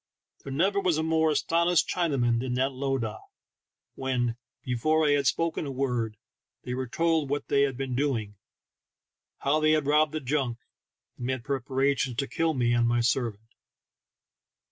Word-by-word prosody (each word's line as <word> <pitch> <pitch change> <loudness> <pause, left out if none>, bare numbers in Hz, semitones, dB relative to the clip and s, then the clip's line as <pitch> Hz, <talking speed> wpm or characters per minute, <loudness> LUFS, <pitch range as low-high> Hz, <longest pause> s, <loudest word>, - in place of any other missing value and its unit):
There 135 - -7
never 190 +8 +2
was 180 -5 +1
a 160 - 0
more 160 0 +2
astonished 170 +2 +2
Chinaman 135 -9 +1
than 125 0 -2
that 135 +2 +1
lowdah 130 -5 -2 0.7
when, 125 -3 -1 0.3
before 155 +6 +1
I - - +4
had 140 -2 +2
spoken 165 -2 0
a - - -4
word, 125 -5 -2 0.5
they 125 - -4
were 130 0 -3
told 160 +3 +1
what 145 +1 -2
they 140 - +3
had 135 -3 +1
been 135 -1 -3
doing, 120 -7 -1 1.1
how 145 +3 +2
they 155 0 +4
had 155 -2 +1
robbed 150 +1 +3
the 155 - -1
junk, 130 -3 -1 0.6
and 120 - -4
made 130 -2 -2
preparations 135 0 0
to 140 +2 -1
kill 165 -1 0
me 120 -2 +2
and 120 0 +3
my 120 0 +2
servant. 115 -3 -1
135 Hz, 165 wpm, -27 LUFS, 125-155 Hz, 1.1 s, I